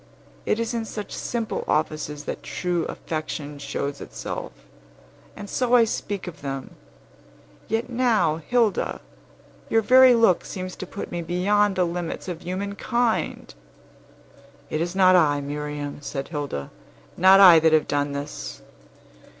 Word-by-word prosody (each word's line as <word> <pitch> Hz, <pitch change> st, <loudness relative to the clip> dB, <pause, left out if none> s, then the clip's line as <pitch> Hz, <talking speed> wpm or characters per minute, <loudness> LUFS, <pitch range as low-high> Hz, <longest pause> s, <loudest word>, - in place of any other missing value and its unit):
It 215 Hz, -, +1 dB
is 230 Hz, +1 st, -2 dB
in 230 Hz, -1 st, -1 dB
such 210 Hz, -2 st, -7 dB
simple 230 Hz, -2 st, -3 dB
offices 150 Hz, -1 st, -1 dB
that -, -, -5 dB
true 175 Hz, -2 st, -2 dB
affection 150 Hz, -2 st, -5 dB
shows 140 Hz, 0 st, -4 dB
itself; -, -, -6 dB, 0.8 s
and 205 Hz, -, -8 dB
so 250 Hz, +3 st, +1 dB
I 240 Hz, -, +7 dB
speak 205 Hz, -3 st, -3 dB
of 175 Hz, -, -9 dB
them. 135 Hz, -2 st, -6 dB, 0.9 s
Yet 225 Hz, +2 st, -1 dB
now, 230 Hz, -11 st, +2 dB
Hilda, 225 Hz, +5 st, 0 dB, 0.7 s
your 225 Hz, 0 st, +3 dB
very 255 Hz, +2 st, +7 dB
look 225 Hz, -6 st, +4 dB
seems 185 Hz, -1 st, -6 dB
to -, -, -6 dB
put 200 Hz, -, -7 dB
me 175 Hz, -, -3 dB
beyond 195 Hz, +4 st, +1 dB
the 185 Hz, -1 st, +2 dB
limits 175 Hz, 0 st, -4 dB
of 175 Hz, -3 st, -5 dB
human 195 Hz, +3 st, -4 dB
kind!" 235 Hz, +2 st, -1 dB, 1.2 s
"It 155 Hz, -, -1 dB
is 175 Hz, +2 st, -2 dB
not 185 Hz, -1 st, +6 dB
I, 150 Hz, -5 st, +4 dB
Miriam," 145 Hz, 0 st, -5 dB
said 135 Hz, -1 st, -5 dB
Hilda; 145 Hz, -, -4 dB, 0.4 s
"not 190 Hz, +2 st, +7 dB
I 180 Hz, -4 st, +9 dB
that 160 Hz, 0 st, +3 dB
have 155 Hz, -1 st, +3 dB
done 145 Hz, 0 st, -1 dB
this." 140 Hz, -, -6 dB
180 Hz, 140 wpm, -24 LUFS, 150-210 Hz, 1.2 s, I